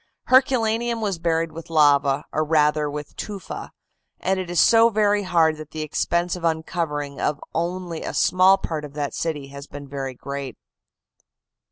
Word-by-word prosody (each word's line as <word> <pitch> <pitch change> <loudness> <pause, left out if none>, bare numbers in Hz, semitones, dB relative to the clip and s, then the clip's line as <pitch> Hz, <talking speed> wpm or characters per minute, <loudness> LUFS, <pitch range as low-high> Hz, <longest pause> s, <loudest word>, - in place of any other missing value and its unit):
Herculaneum 240 -3 +3
was 200 -6 -2
buried 165 -1 0
with 165 +1 -10
lava, 145 -2 +3
or 155 - +1
rather 150 -1 +2
with 150 0 -7
tufa, 200 -4 -7 0.5
and 190 +1 0
it 185 -2 -5
is 175 - 0
so 230 0 +6
very 210 -1 +2
hard 165 -4 +2
that 155 -1 -9
the 155 -1 -5
expense 170 +3 0
of 180 - -9
uncovering 160 -3 -2
of 150 0 0
only 175 0 -3
a - - -5
small 185 +1 +5
part 155 -5 -4
of 145 -1 -9
that 145 -1 -3
city 150 -4 -3
has 140 +1 -10
been 145 -1 -9
very 135 -2 -5
great. 140 +1 -6
160 Hz, 165 wpm, -23 LUFS, 145-185 Hz, 0.5 s, so